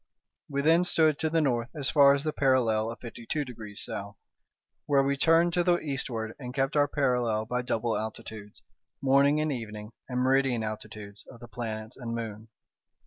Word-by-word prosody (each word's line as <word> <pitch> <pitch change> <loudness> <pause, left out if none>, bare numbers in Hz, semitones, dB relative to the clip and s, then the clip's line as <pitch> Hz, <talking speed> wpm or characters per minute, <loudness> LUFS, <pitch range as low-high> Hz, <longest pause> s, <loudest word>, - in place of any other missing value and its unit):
We 140 -1 -1
then 165 +3 +5
stood 160 -4 +3
to 160 - 0
the 165 0 +2
north 120 -4 0
as 145 -2 -1
far 140 -2 +7
as 140 - -3
the 155 -1 -1
parallel 115 -5 +2
of 115 - -6
fifty 115 -1 -10
two 150 -2 -1
degrees 110 -5 -7
south, 100 -2 -6 0.7
when 140 -2 +3
we 140 0 +1
turned 165 +4 +4
to 175 - +2
the 175 0 +3
eastward, 125 -7 -3
and 125 -1 -7
kept 135 +1 0
our 145 -1 +4
parallel 125 -7 0
by 125 +2 -1
double 115 -2 -1
altitudes, 110 -1 -7 0.4
morning 140 +2 +4
and 155 0 0
evening, 105 -4 -6 0.2
and 125 0 -1
meridian 130 -2 +2
altitudes 110 -1 -7
of 120 - -13
the 120 - -11
planets 110 -1 -6
and 115 -3 -4
moon. 110 -1 -6
125 Hz, 185 wpm, -28 LUFS, 110-140 Hz, 0.7 s, far